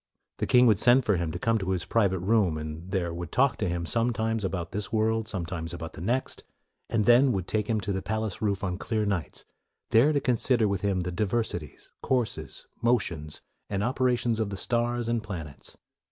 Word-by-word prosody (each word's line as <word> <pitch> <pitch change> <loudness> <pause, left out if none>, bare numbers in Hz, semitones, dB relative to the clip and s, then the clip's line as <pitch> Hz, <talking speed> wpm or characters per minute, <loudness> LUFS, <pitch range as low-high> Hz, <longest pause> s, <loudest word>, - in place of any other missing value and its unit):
The - - -2
king 125 0 +6
would 110 -5 +4
send 125 +1 +5
for 105 -4 +2
him 85 -2 -2
to 90 - -4
come 115 +4 +1
to 95 -2 -3
his 95 -3 -1
private 100 -6 +1
room, 95 -5 +2
and 80 +3 -7
there 90 -3 -1
would 85 -1 -6
talk 135 -2 +2
with 95 - +1
him 85 -1 -2
sometimes 115 +1 0
about 90 -3 -3
this 100 -1 -4
world, 110 0 +1
sometimes 85 -4 -4
about 80 -2 -7
the - - -9
next, 120 +8 -2 0.5
and 110 -2 +1
then 125 +3 +6
would 95 -2 -3
take 105 -1 -1
him 110 -2 +1
to 100 +1 -2
the 95 - -2
palace 110 -2 -3
roof 100 -3 0
on 90 -1 -2
clear 110 -2 -1
nights, 100 -6 -3 0.2
" - - -55
there 125 +7 +5
to 145 - +2
consider 120 -3 +2
with 100 -2 -1
him 100 -3 0
the 90 0 -3
diversities, 95 - -3
courses, 110 - -2 0.2
motions, 95 -11 0 0.3
and 100 0 -1
opera 125 +1 +2
tions 120 -1 -1
of 110 -2 0
the 100 - -5
stars 120 +2 0
and 115 -1 0
planets.'' 85 -9 -8
105 Hz, 210 wpm, -27 LUFS, 90-115 Hz, 0.5 s, king